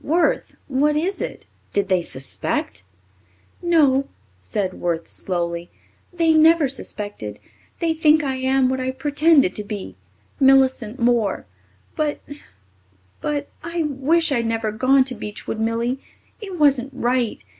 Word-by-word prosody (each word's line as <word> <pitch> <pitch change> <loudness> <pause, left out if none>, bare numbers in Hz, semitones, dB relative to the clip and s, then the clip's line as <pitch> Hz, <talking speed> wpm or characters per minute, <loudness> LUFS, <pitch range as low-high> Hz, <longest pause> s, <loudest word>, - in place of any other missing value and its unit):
"Worth, 350 - +1
what 290 +2 +2
is 360 +6 -1
it? - - -5 0.3
Did 200 -1 +1
they 185 -2 +2
suspect?" 130 - -2 0.8
"No," 290 -6 +3 0.3
said 185 - -2
Worth 170 -2 -2
slowly. 170 -2 -3 0.4
"They 335 -2 +2
never 315 -1 +5
suspected. 205 - -4 0.4
They 330 -1 +1
think 310 -1 +4
I 265 -2 -1
am 260 0 +2
what 260 0 -1
I 255 0 -2
pretended 290 - +3
to 210 - -3
be 200 - -6 0.4
Millicent 265 -4 +4
Moore. 235 -4 +1 0.5
But, 300 -1 -1 1.0
but, 290 -1 -2
I 335 0 -2
wish 300 +3 +1
I'd 235 -4 +1
never 225 -1 -1
gone 260 +5 +4
to 255 -1 -5
Beechwood, 215 0 -6
Millie. 230 +3 -1 0.4
It 385 -4 -6
wasn't 275 -4 +3
right. 240 -1 0
260 Hz, 130 wpm, -22 LUFS, 215-300 Hz, 1.0 s, never